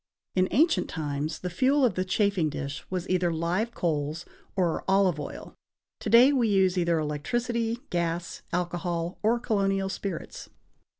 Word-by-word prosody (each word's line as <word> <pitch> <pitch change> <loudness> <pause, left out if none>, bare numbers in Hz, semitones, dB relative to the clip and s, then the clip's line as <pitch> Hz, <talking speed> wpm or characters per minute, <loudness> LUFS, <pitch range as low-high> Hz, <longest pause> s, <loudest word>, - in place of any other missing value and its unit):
In 185 0 +2
ancient 315 - +3
times, 150 0 -3
the 180 - -3
fuel 270 +6 +3
of 235 - +2
the 185 - -1
chafing 190 -3 +1
dish 140 0 -5
was 185 -1 -3
either 180 -1 +1
live 175 +8 -1
coals 155 0 -1 0.3
or 180 -4 0
olive 190 -4 +3
oil; 145 - -7 0.5
to - - -4
day 245 +5 +7
we 245 -4 +2
use 190 -3 +3
either 170 -2 +2
electricity, 230 +10 -1
gas, 170 0 -2
alcohol 175 0 -2
or 225 +3 +3
colonial 195 -4 0
spirits. 190 -2 -5
185 Hz, 145 wpm, -27 LUFS, 170-215 Hz, 0.5 s, day